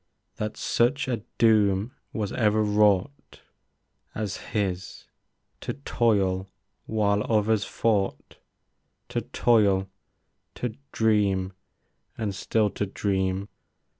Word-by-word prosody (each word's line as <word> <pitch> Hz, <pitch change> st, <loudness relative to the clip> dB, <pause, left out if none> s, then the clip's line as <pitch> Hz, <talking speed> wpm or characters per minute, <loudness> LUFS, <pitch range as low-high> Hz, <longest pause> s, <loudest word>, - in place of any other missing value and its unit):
That 105 Hz, 0 st, -3 dB
such 125 Hz, +4 st, +1 dB
a 120 Hz, -4 st, -1 dB, 0.2 s
doom 110 Hz, 0 st, +3 dB, 0.2 s
was 105 Hz, -3 st, -3 dB
ever 110 Hz, -3 st, +2 dB
wrought 105 Hz, +5 st, +1 dB, 0.7 s
As 105 Hz, -3 st, -3 dB
his, 95 Hz, -4 st, -3 dB, 0.5 s
to -, -, -4 dB
toil 100 Hz, -8 st, +1 dB, 0.4 s
while 105 Hz, -2 st, +1 dB
others 110 Hz, -1 st, +2 dB
fought; 105 Hz, -4 st, -1 dB, 0.7 s
To -, -, -1 dB
toil, 100 Hz, -5 st, +2 dB, 0.6 s
to 120 Hz, -3 st, -3 dB, 0.2 s
dream 100 Hz, -4 st, +2 dB, 0.3 s
— -, -, -45 dB
and 105 Hz, -3 st, -2 dB
still 105 Hz, +2 st, +1 dB
to 100 Hz, -, -2 dB
dream. 95 Hz, -1 st, -1 dB
105 Hz, 100 wpm, -26 LUFS, 95-110 Hz, 0.7 s, doom